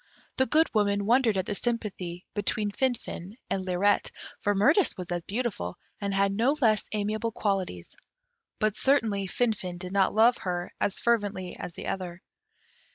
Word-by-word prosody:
The 260 Hz, -, +3 dB
Good 315 Hz, +6 st, +4 dB
Woman 200 Hz, -2 st, +2 dB
wondered 230 Hz, -2 st, +4 dB
at 185 Hz, -, 0 dB
the -, -, -2 dB
sympathy 195 Hz, -6 st, -3 dB
between 205 Hz, 0 st, 0 dB
Finfin 230 Hz, -5 st, -2 dB
and 190 Hz, -, 0 dB
Lirette, 185 Hz, +2 st, +2 dB, 0.3 s
for 205 Hz, 0 st, +1 dB
Mirtis 290 Hz, -, +4 dB
was 180 Hz, -, -4 dB
as 175 Hz, 0 st, -1 dB
beautiful, 205 Hz, -, -2 dB, 0.2 s
and 200 Hz, -1 st, -2 dB
had 195 Hz, 0 st, +2 dB
no 245 Hz, +8 st, +2 dB
less 220 Hz, -5 st, +2 dB
amiable 215 Hz, +2 st, -1 dB
qualities; 190 Hz, -, -2 dB, 0.6 s
but 215 Hz, -2 st, +1 dB
certainly 220 Hz, -8 st, +2 dB
Finfin 190 Hz, -4 st, -1 dB
did 180 Hz, +1 st, -7 dB
not 195 Hz, 0 st, +2 dB
love 230 Hz, +3 st, +5 dB
her 175 Hz, -1 st, -3 dB
as 200 Hz, -, 0 dB
fervently 205 Hz, -6 st, 0 dB
as 170 Hz, -, -7 dB
the -, -, -7 dB
other. 180 Hz, -1 st, -4 dB
205 Hz, 160 wpm, -28 LUFS, 185-230 Hz, 0.6 s, love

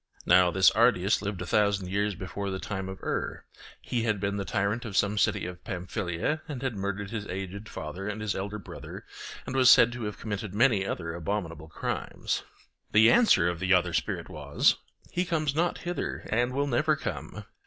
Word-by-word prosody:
(Now 90 Hz, 0 st, +6 dB
this 95 Hz, +1 st, +5 dB
Ardiaeus 110 Hz, -3 st, +3 dB
lived 100 Hz, -3 st, -3 dB
a -, -, -6 dB
thousand 100 Hz, -2 st, +1 dB
years 100 Hz, +1 st, 0 dB
before 100 Hz, +2 st, -4 dB
the 95 Hz, -, -2 dB
time 95 Hz, -1 st, -4 dB
of 95 Hz, -, -9 dB
Er: -, -, -3 dB, 0.3 s
he 120 Hz, -, -2 dB
had 110 Hz, -3 st, 0 dB
been 100 Hz, +1 st, -1 dB
the 100 Hz, -, -1 dB
tyrant 100 Hz, +5 st, 0 dB
of 105 Hz, -5 st, -4 dB
some 105 Hz, 0 st, +2 dB
city -, -, +2 dB
of 90 Hz, 0 st, -7 dB
Pamphylia, 90 Hz, -, -2 dB
and 140 Hz, -5 st, -6 dB
had 130 Hz, -4 st, -1 dB
murdered 100 Hz, 0 st, -3 dB
his 105 Hz, -3 st, -4 dB
aged 95 Hz, +3 st, -6 dB
father 85 Hz, +6 st, -6 dB
and 105 Hz, 0 st, -3 dB
his 105 Hz, -2 st, -1 dB
elder 100 Hz, +2 st, -4 dB
brother, 100 Hz, -, -9 dB, 0.4 s
and 130 Hz, -, -5 dB
was 130 Hz, -1 st, +6 dB
said 120 Hz, -1 st, +8 dB
to 120 Hz, -2 st, -5 dB
have 105 Hz, -, -4 dB
committed 105 Hz, -2 st, -5 dB
many 110 Hz, -3 st, +4 dB
other 85 Hz, -2 st, -3 dB
abominable 85 Hz, -3 st, -4 dB
crimes.) -, -, -3 dB, 0.5 s
The 110 Hz, +2 st, +7 dB
answer 225 Hz, -, +5 dB
of 85 Hz, -1 st, -2 dB
the 95 Hz, +1 st, +4 dB
other 90 Hz, -1 st, +1 dB
spirit -, -, -1 dB
was: -, -, +2 dB, 0.3 s
'He 180 Hz, -, 0 dB
comes 155 Hz, -5 st, 0 dB
not 170 Hz, +3 st, +1 dB
hither 175 Hz, 0 st, -4 dB
and 120 Hz, +3 st, +2 dB
will 140 Hz, +2 st, 0 dB
never 120 Hz, -4 st, +2 dB
come. -, -, -5 dB
100 Hz, 195 wpm, -28 LUFS, 95-115 Hz, 0.5 s, said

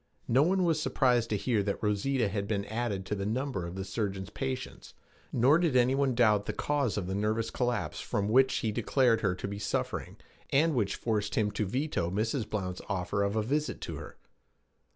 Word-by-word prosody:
No 130 Hz, +4 st, +4 dB
one 185 Hz, +4 st, +3 dB
was 165 Hz, -3 st, +2 dB
surprised 125 Hz, -6 st, +2 dB
to 105 Hz, -, +1 dB
hear 110 Hz, 0 st, +1 dB
that 100 Hz, +1 st, -3 dB
Rosita 110 Hz, +4 st, +1 dB
had 100 Hz, 0 st, -2 dB
been 100 Hz, -2 st, -1 dB
added 110 Hz, -3 st, -2 dB
to 105 Hz, -, -3 dB
the 100 Hz, -1 st, -2 dB
number 120 Hz, -5 st, -2 dB
of 85 Hz, -, -7 dB
the 95 Hz, 0 st, -4 dB
surgeon's 100 Hz, -3 st, -3 dB
patients, 130 Hz, 0 st, -5 dB, 0.4 s
nor 135 Hz, +7 st, +4 dB
did 165 Hz, -7 st, +1 dB
any 125 Hz, +1 st, +4 dB
one 135 Hz, -2 st, +1 dB
doubt 105 Hz, -4 st, +3 dB
the -, -, -1 dB
cause 140 Hz, -8 st, 0 dB
of 100 Hz, -, -1 dB
the 95 Hz, -, -3 dB
nervous 110 Hz, +3 st, 0 dB
collapse 120 Hz, -6 st, -1 dB
from 100 Hz, -1 st, -1 dB
which 130 Hz, +4 st, +5 dB
he 110 Hz, -, +1 dB
declared 120 Hz, +1 st, +2 dB
her 95 Hz, -4 st, +1 dB
to -, -, -5 dB
be 100 Hz, 0 st, -5 dB
suffering, 100 Hz, -, -3 dB, 0.3 s
and 155 Hz, +4 st, +3 dB
which 105 Hz, -6 st, 0 dB
forced 105 Hz, -3 st, -1 dB
him 105 Hz, -1 st, +1 dB
to 105 Hz, 0 st, -2 dB
veto 130 Hz, -, -1 dB
Mrs. 110 Hz, +4 st, -1 dB
Blount's 90 Hz, -4 st, -3 dB
offer 100 Hz, +2 st, -1 dB
of 100 Hz, +1 st, 0 dB
a 110 Hz, -, +1 dB
visit 150 Hz, +6 st, -1 dB
to -, -, -5 dB
her. -, -, -10 dB
110 Hz, 205 wpm, -30 LUFS, 100-130 Hz, 0.4 s, which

